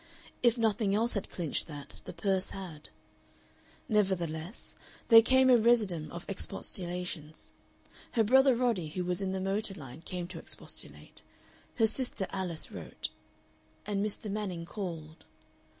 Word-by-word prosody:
If 240 0 +4
nothing 215 -3 +2
else 230 +3 +4
had 200 - -2
clinched 165 -5 -1
that, 145 -2 -9
the 180 - -6
purse 190 +2 +1
had. 175 -6 -7 1.0
Nevertheless 185 -4 -1 0.3
there 225 -1 +10
came 260 +3 +4
a 250 -1 +7
residuum 215 -9 +2
of 170 - -7
expostulations. 180 -5 -2 0.6
Her 225 - +4
brother 265 +3 +5
Roddy, 230 -9 +1
who 180 +4 -3
was 180 +1 -1
in 190 -1 -1
the 190 - -2
motor 195 +1 -1
line, 140 -2 -10
came 175 +1 -5
to 175 -3 -7
expostulate; - - -3 0.5
her 225 - +4
sister 220 -3 0
Alice 185 -4 -2
wrote. - - -6 0.7
And 200 -1 -1
Mr. 210 +1 -2
Manning 190 -5 -3
called. 165 -5 -6
190 Hz, 135 wpm, -31 LUFS, 170-220 Hz, 1.0 s, there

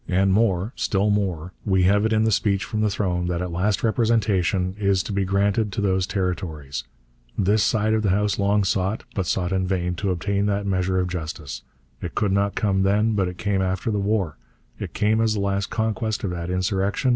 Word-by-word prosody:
And 95 +1 +3
more 100 0 +1
still 105 +1 +1
more: 95 -4 -1
we 95 -3 +2
have 100 +3 +4
it - - -4
in 110 0 +3
the 110 - +2
Speech 100 0 +1
from 110 -2 -3
the 105 - +2
Throne 90 -3 -1
that 90 -1 -1
at 90 0 -3
last 95 +4 0
representation 105 -5 +1
is 100 -2 +2
to 105 - -5
be 100 0 0
granted 100 +2 +1
to - - -3
those 95 -2 +1
Territories. 90 -8 -3 0.5
This 105 +2 +3
side 110 0 +2
of 110 - +2
the 105 - +1
House 105 +2 +1
long 100 +1 +2
sought, 95 +2 0
but 95 -3 -2
sought 90 +1 0
in 95 -1 0
vain, 90 -2 -1
to 100 - -1
obtain 100 +3 0
that 100 0 0
measure 95 -1 0
of 90 - 0
justice. 80 -5 -5 0.4
It - - -6
could 105 -3 +1
not 100 +1 +1
come 100 -3 +1
then, 105 +3 +2
but 100 -3 +1
it 90 0 -6
came 100 -1 0
after 95 +4 -1
the 105 - 0
war; 100 -6 0 0.4
it - - -6
came 110 +2 +2
as 110 -1 +2
the - - -1
last 100 0 0
conquest 110 -1 -1
of 95 - -1
that 85 -1 -4
insurrection. 95 +6 0
100 Hz, 215 wpm, -23 LUFS, 90-105 Hz, 0.5 s, have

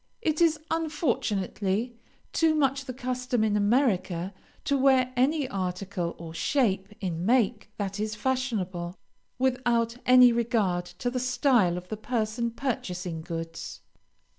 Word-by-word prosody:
It 315 -4 +1
is, 325 -2 +4
unfortunately, 235 - -1 0.4
too 320 -1 +3
much 275 -2 +1
the 255 - -5
custom 250 -2 -1
in 215 -1 +2
America 205 -5 +1 0.3
to 280 - +2
wear 260 -2 +3
any 275 +3 +2
article, 185 -3 -3
or 165 -1 -8
shape 195 - +1
in 175 -3 -2
make, 230 0 +2
that 200 0 -3
is 215 0 -2
fashionable, 205 -9 -2 0.4
without 245 -2 +1
any 250 -1 +8
regard 220 -7 +1
to 175 +8 -4
the 255 - -1
style 250 -7 +2
of 180 0 -8
the 215 - -4
person 230 +1 -1
purchasing 185 -9 -3
goods. 165 0 -6
230 Hz, 130 wpm, -27 LUFS, 190-255 Hz, 0.4 s, any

